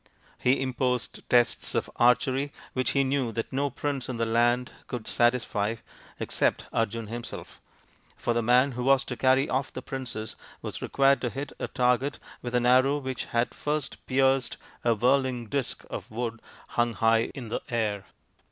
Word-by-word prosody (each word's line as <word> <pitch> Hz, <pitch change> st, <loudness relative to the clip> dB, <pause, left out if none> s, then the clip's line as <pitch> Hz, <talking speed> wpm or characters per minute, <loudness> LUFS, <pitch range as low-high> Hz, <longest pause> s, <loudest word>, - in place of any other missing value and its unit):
He 125 Hz, +2 st, +3 dB
imposed 125 Hz, -1 st, -2 dB
tests 120 Hz, -1 st, +2 dB
of -, -, +1 dB
archery 130 Hz, +3 st, +3 dB, 0.2 s
which 130 Hz, 0 st, 0 dB
he 140 Hz, -, +3 dB
knew 135 Hz, -3 st, 0 dB
that 115 Hz, +3 st, -3 dB
no 140 Hz, +2 st, +1 dB
prince 140 Hz, -1 st, -3 dB
in 125 Hz, -, -3 dB
the 115 Hz, -, +1 dB
land 120 Hz, +2 st, +2 dB, 0.2 s
could 120 Hz, -3 st, -5 dB
satisfy 115 Hz, -3 st, +1 dB, 0.4 s
except -, -, 0 dB
Arjun 115 Hz, 0 st, 0 dB
himself; 115 Hz, +2 st, -7 dB, 0.6 s
for 120 Hz, -, 0 dB
the 120 Hz, -, +1 dB
man 125 Hz, +4 st, +4 dB
who 125 Hz, 0 st, -4 dB
was 135 Hz, +1 st, +4 dB
to 125 Hz, -, -5 dB
carry 130 Hz, +3 st, +3 dB
off 130 Hz, +1 st, -1 dB
the -, -, -7 dB
princess 125 Hz, -5 st, -5 dB, 0.3 s
was -, -, -4 dB
required 135 Hz, -2 st, +3 dB
to 120 Hz, -, 0 dB
hit 140 Hz, +4 st, -5 dB
a -, -, -2 dB
target 125 Hz, +2 st, +1 dB, 0.2 s
with 120 Hz, 0 st, -4 dB
an 120 Hz, 0 st, +2 dB
arrow 130 Hz, +3 st, +5 dB
which 130 Hz, -3 st, -4 dB
had 120 Hz, +1 st, 0 dB
first 150 Hz, -1 st, -3 dB
pierced 135 Hz, -1 st, +2 dB, 0.3 s
a 115 Hz, -1 st, +3 dB
whirling 125 Hz, +1 st, +2 dB
disc 135 Hz, +4 st, -3 dB
of -, -, -6 dB
wood 115 Hz, 0 st, -4 dB, 0.3 s
hung 120 Hz, 0 st, +1 dB
high 115 Hz, +2 st, +3 dB
in 125 Hz, -5 st, -6 dB
the 115 Hz, -, -2 dB
air. 105 Hz, -4 st, -1 dB
125 Hz, 170 wpm, -27 LUFS, 115-135 Hz, 0.6 s, arrow